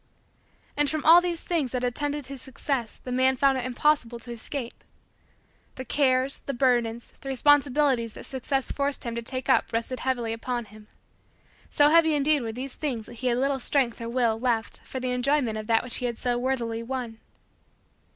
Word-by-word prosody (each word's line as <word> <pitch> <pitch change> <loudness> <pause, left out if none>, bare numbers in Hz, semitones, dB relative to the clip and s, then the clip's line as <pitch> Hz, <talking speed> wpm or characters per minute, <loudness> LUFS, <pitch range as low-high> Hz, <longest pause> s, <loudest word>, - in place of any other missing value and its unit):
And 290 -1 +2
from 310 -1 -3
all 335 +2 +9
these 345 -2 -3
things 310 -8 -1
that 250 -1 -1
attended 290 +3 -1
his 270 -1 -8
success 260 -3 -3
the 250 - -8
man 260 +1 +3
found 270 0 +3
it 250 - -3
impossible 255 -2 +1
to 240 +1 -9
escape. 235 +2 -5 0.9
The 260 - -6
cares, 260 0 +2
the 275 - -2
burdens, 240 -2 +1
the 270 - -6
responsibilities 270 -3 +3
that - - -10
Success 270 0 -2
forced 280 0 -1
him 235 -2 -4
to 235 - -3
take 255 +2 -5
up - - +3
rested 230 +2 -2
heavily 240 -3 -1
upon 240 +1 -3
him. 210 0 -15 0.8
So 290 0 +5
heavy 320 -1 +5
indeed 295 0 +2
were 225 -2 -3
these 255 +4 -6
things 250 -8 -3
that 240 - -11
he 250 +2 -4
had 240 -1 +2
little 270 +1 +1
strength 250 -3 +1
or 230 - -4
will 235 -2 +1
left 230 -2 -1
for 260 - -5
the 255 0 -2
enjoyment 250 -2 +1
of 215 0 -5
that 225 -1 +3
which 250 - -3
he 250 - -3
had 235 -2 -4
so 245 -1 0
worthily 240 -3 -1
won. 235 -2 -5
255 Hz, 190 wpm, -26 LUFS, 235-275 Hz, 0.9 s, all